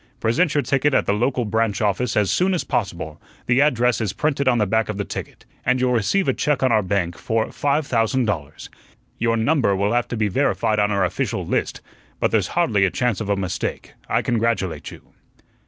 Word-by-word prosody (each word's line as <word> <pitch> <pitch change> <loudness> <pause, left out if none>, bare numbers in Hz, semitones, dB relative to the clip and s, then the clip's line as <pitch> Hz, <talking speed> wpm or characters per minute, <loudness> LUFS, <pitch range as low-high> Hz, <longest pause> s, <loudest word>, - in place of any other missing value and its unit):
"Present 150 +8 +1
your 145 - +2
ticket 140 +1 +1
at - - +2
the - - +1
local 125 +3 0
branch 110 0 0
office 115 +3 0
as 105 -2 +2
soon 185 +1 +2
as 170 - -1
possible 85 -8 -3 0.2
the 125 +2 +3
address 125 -5 +2
is 100 -3 -1
printed 140 -2 -1
on 125 -2 +4
the 105 - +2
back 110 +3 0
of 105 - -3
the 100 - -2
ticket - - -7 0.2
and 125 +1 +2
you'll 125 0 +2
receive 125 - +1
a 135 - +3
check 145 0 0
on 130 - +3
our 110 - +4
bank 90 -3 -1
for 110 +7 -1
five 145 +1 0
thousand 120 +1 +1
dollars. 80 -8 -4 0.5
Your 115 0 +1
number 115 -4 +2
will 100 +3 0
have 120 0 +1
to 120 - -4
be 110 -1 +1
verified 110 -1 +1
on 105 0 +2
our 100 -2 +1
official 90 - -2
list, - - -2 0.4
but - - +1
there's - - +2
hardly 100 -2 +3
a 95 - +4
chance 120 +1 -1
of 105 - -4
a 100 - +2
mistake. 95 -3 -4 0.2
I - - +1
congratulate 115 -7 -1
you." - - -15
115 Hz, 215 wpm, -22 LUFS, 100-130 Hz, 0.5 s, on